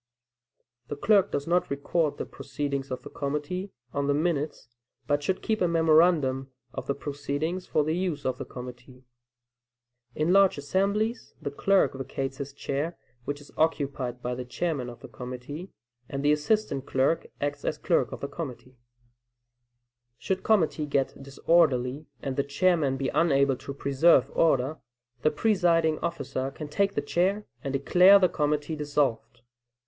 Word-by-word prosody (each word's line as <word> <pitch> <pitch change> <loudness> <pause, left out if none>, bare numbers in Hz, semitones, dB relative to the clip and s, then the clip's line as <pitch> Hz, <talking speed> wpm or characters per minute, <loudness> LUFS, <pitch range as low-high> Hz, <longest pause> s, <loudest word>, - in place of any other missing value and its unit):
The - - -4
clerk 200 +6 +3
does 140 - -2
not 175 +1 +1
record 145 +2 0
the - - -3
proceedings 140 0 -4
of 130 -1 -5
the - - -8
committee 150 +7 -3 0.2
on 140 0 -1
the 145 - +2
minutes, 150 -5 -1 0.4
but 145 +2 +1
should 185 +6 -1
keep 220 -1 0
a 180 - +4
memorandum 160 -5 +3 0.2
of - - -6
the 140 - 0
proceedings 145 +5 -3
for 155 - +2
the 155 +2 0
use 175 -5 -2
of 130 -1 -1
the - - -3
committee. 125 +1 -10 1.1
In 155 +4 +2
large 195 -3 +5
assemblies 200 - -1
the 140 - -4
clerk 195 +7 +3
vacates 135 0 -4
his 140 0 -5
chair, 140 +4 -3 0.3
which 145 0 -3
is 145 - -15
occupied 140 -6 -1
by 125 - -1
the 125 +1 -4
chairman 130 0 -2
of 120 - -11
the - - -9
committee, 130 +8 -7 0.4
and 140 +1 -3
the 145 - +5
assistant 150 -2 0
clerk 135 +5 +1
acts 145 0 -2
as - - -1
clerk - - +1
of - - -7
the 140 - -2
committee. 130 -4 -8 1.4
Should 190 -1 -1
the - - -25
committee 165 -7 +2
get 140 -1 -1
disorderly, 140 -1 +2 0.2
and 135 -1 -3
the 140 - +2
chairman 145 -1 +2
be 135 0 -1
unable 140 -5 +3
to 140 - -8
preserve 140 0 +4
order, 150 -1 +2 0.4
the 155 - +4
presiding 165 -3 +2
officer 135 -5 -3
can 150 +2 -8
take 200 +5 +1
the 145 - 0
chair, 190 +7 +1 0.2
and 140 - -2
declare 180 +8 +6
the 185 -2 +3
committee 150 +1 -1
dissolved. 145 -6 -1
145 Hz, 160 wpm, -27 LUFS, 135-170 Hz, 1.4 s, declare